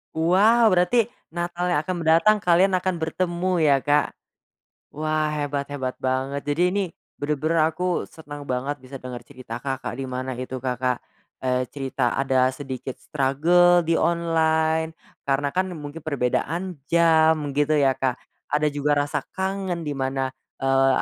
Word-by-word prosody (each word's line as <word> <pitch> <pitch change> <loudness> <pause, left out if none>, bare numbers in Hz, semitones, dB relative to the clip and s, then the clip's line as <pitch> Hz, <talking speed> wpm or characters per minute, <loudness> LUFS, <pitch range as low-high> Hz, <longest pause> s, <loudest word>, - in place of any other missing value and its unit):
Wow 205 +8 +4
berarti 195 +6 +3 0.2
Natal 175 +1 -2
yang 175 -4 +2
akan 185 +1 -2
mendatang 165 +7 +5
kalian 180 +1 +4
akan 185 0 -1
bertemu 175 +2 -1
ya 145 -3 +4
Kak, 145 0 +2 0.8
wah 155 +1 0
hebat 145 -1 -2
hebat 130 -3 -4
banget 135 +2 -2
jadi 170 +5 +2
ini, 200 +2 0 0.4
bener-bener 155 +2 +1
aku 180 +3 -1
seneng 145 -2 -10
banget 135 +3 -2
bisa 130 +1 -10
denger 125 -1 -7
cerita 120 -2 -8
Kakak 130 -3 -4
dimana 130 -1 -4
itu 130 0 -5
Kakak, 125 -1 -1 0.4
eee, 130 0 0
cerita 135 -3 -2
ada 130 -1 +2
sedikit 130 -2 -6
struggle 170 +6 +3
di 165 0 +1
online 160 -1 +1 0.3
karena 140 +1 +1
kan 185 +5 0
mungkin 150 0 -8
perbedaan 155 +6 -1
jam 160 -3 +4
gitu 145 +2 +1
ya 135 -3 +3
Kak, 130 -2 +1 0.4
ada 150 0 +2
juga 145 +1 +1
rasa 145 -1 -3
kangen 190 -2 -2
dimana, 135 -3 -2 0.3
eee, 135 0 +4
150 Hz, 140 wpm, -24 LUFS, 135-170 Hz, 0.8 s, mendatang